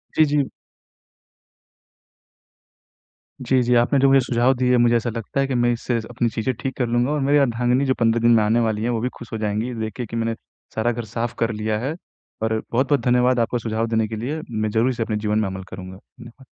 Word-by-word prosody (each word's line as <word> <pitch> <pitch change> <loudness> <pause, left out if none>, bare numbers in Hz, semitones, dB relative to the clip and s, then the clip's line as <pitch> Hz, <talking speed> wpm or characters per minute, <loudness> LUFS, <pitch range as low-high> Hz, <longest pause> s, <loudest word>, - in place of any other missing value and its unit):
जी, 155 - +5
जी। 145 -2 +1 3.0
जी, 130 -1 +3
जी 125 +1 +1
आपने 120 +4 +3
जो 135 - +5
मुझे 135 0 +6
सुझाव 120 +2 +2
दिए 125 0 +3
मुझे 120 0 +4
ऐसा 115 +1 -2
लगता 115 +3 -4
है 135 - +2
कि 135 - -2
मैं 120 0 +2
इससे 120 +1 -2
अपनी 120 0 0
चीज़ें 115 +4 -2
ठीक 135 - -3
कर 125 - +1
लूँगा 120 +3 +1
और 150 - 0
मेरी 140 +2 +3
अर्धांगनी 125 0 +2
जो 130 - +2
15 115 0 +2
दिन 120 +1 +4
में 110 - +4
आने 110 +3 +2
वाली 110 -2 0
हैं, 120 - 0
वो 120 -2 0
भी 125 - -1
खुश 120 - -11
हो - - -1
जाएँगी 105 +1 -1
ये 125 - -5
देख 110 -1 -3
के 125 - -3
कि 115 - -8
मैंने, 115 0 -1 0.4
सारा 110 +2 +1
घर 120 -1 -5
साफ 115 +2 -3
कर 115 0 +1
लिया 110 0 -2
है। 135 +7 -3 0.5
और 110 0 +1 0.2
बहुत-बहुत 135 +4 +2
धन्यवाद 125 0 +3
आपको 120 +1 0
सुझाव 115 0 -2
देने 110 -1 +1
के 110 - -5
लिए, 135 +9 -4
मैं 110 -1 -1
ज़रूर 115 +4 +2
इसे 120 -3 -1
अपने 110 -1 -2
जीवन 105 0 0
में 105 - 0
अमल 95 0 -6
करूँगा। 95 0 -8
धन्यवाद। 120 +5 -16
120 Hz, 230 wpm, -22 LUFS, 110-125 Hz, 3.0 s, मुझे